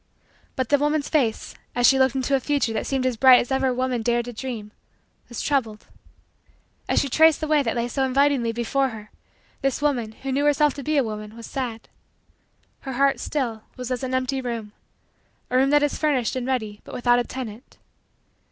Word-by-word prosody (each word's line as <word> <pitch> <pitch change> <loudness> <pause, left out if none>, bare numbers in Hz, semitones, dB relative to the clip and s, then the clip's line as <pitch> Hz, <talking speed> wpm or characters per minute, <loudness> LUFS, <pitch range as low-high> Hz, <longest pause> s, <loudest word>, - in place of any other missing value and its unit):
But 260 -2 -2
the 285 - +4
woman's 295 0 0
face, 255 -8 0 0.2
as 245 0 +2
she 265 +1 +6
looked 265 0 +3
into 265 +1 -1
a - - +2
future 270 -4 0
that 220 - -3
seemed 265 -2 -1
as 255 -3 0
bright 255 +1 +8
as 245 - -4
ever 265 -1 +2
woman 250 -1 -1
dared 240 +1 0
to 245 - -7
dream, 225 -3 -6 0.6
was 240 - -5
troubled. 230 -7 -1 1.0
As - - +3
she 280 - 0
traced 315 +3 +4
the 310 - -3
way 300 -1 +3
that 235 -3 -2
lay 235 0 -1
so 270 +2 -1
invitingly 265 -2 +2
before 250 +4 0
her, 215 -2 -10 0.5
this 270 -2 0
woman, 245 -7 -1
who 270 - -2
knew 280 +2 +1
herself 295 -1 +3
to 280 - -8
be 305 +1 0
a 275 - +4
woman, 215 0 -6
was 230 - -9
sad. 245 -5 -5 0.9
Her 270 - -6
heart, 275 0 +2
still, 240 -7 -3 0.2
was 250 0 -5
as 250 - -2
an 260 -1 -2
empty 260 +1 -1
room 230 -4 -5 0.8
a 255 - +3
room 270 +1 +4
that 295 0 +4
is 290 - -1
furnished 275 -7 +1
and 255 -1 -3
ready 220 -6 -2
but - - -10
without 245 0 +3
a - - +1
tenant. 240 -1 -8
255 Hz, 205 wpm, -23 LUFS, 235-275 Hz, 1.0 s, bright